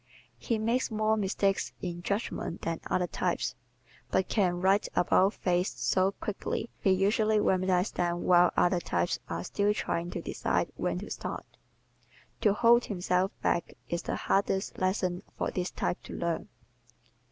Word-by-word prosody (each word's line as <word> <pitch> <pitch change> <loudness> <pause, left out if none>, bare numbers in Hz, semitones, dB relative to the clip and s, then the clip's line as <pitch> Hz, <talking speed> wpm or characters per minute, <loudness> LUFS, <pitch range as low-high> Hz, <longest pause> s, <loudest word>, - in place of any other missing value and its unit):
He 230 - -1
makes 230 +4 0
more 215 0 +1
mistakes 195 -1 0
in 175 -1 -5
judgment 200 -2 -3
than 165 -1 -2
other 180 - +1
types 175 0 -1 0.6
but 190 - +1
can 180 -5 +1
"right 195 +3 +3
about 185 +3 +3
face" 180 0 0
so 190 +1 +2
quickly 210 +3 -4
he 195 - +1
usually 210 +3 +3
remedies 185 -1 +2
them 175 0 -1
while 175 0 +5
other 175 0 +3
types 85 - -1
are 85 - -3
still 205 - +1
trying 170 -3 -2
to - - -4
decide - - -1
when - - -1
to - - -7
start. - - -5 1.0
To 210 - +4
hold 235 +3 +5
himself 185 -1 0
back 170 - 0
is 170 0 -1
the - - -3
hardest 195 0 0
lesson 185 -1 0 0.2
for - - -1
this 180 0 -2
type - - -2
to - - -8
learn. 170 -1 -2
185 Hz, 150 wpm, -29 LUFS, 175-205 Hz, 1.0 s, while